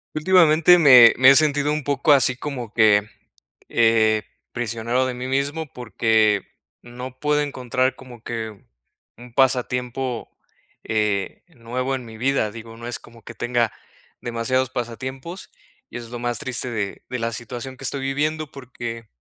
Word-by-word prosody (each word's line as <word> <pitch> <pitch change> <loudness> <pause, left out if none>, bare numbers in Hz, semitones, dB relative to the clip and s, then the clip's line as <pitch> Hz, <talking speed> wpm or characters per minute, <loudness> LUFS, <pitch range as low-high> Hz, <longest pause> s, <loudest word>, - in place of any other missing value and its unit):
Últimamente, 165 0 +5
me 130 -8 +8
me 130 +1 +8
he - - +6
sentido 145 0 +4
un 150 -1 -3
poco 140 +1 +2
así 125 -2 +4
como 125 -6 -6
que, 105 -2 +4 0.7
eh, 110 -2 +3 0.3
prisionero 120 +2 -1
de 130 - -3
mí 125 +1 -6
mismo 140 +4 -1
porque 110 -4 +1 0.4
no 125 +1 -9
puedo 150 0 +1
encontrar 130 -2 -1
como 125 -3 -13
que 115 -1 -5 0.7
un 120 0 -14
pasatiempo, 125 -1 0 0.5
eh, 105 -3 -1
nuevo 130 -3 -4
en 130 - -6
mi 110 -2 -11
vida. 125 -3 0
Digo, 115 0 -11
no 115 +1 -10
es 120 - -4
como 115 -1 -17
que 120 - -10
tenga 120 -1 0 0.5
demasiados 120 +2 -1
pasatiempos 130 - -6 0.4
y - - -13
eso 120 -1 -8
es - - -16
lo 120 - -6
más 120 -1 -1
triste 130 +2 -1
de 105 -4 -4
de 125 - -3
la 115 0 -2
situación 120 +2 -6
que 135 - -8
estoy 140 +1 -1
viviendo 150 +3 -2
porque, 120 -4 -8
125 Hz, 155 wpm, -22 LUFS, 115-135 Hz, 0.7 s, me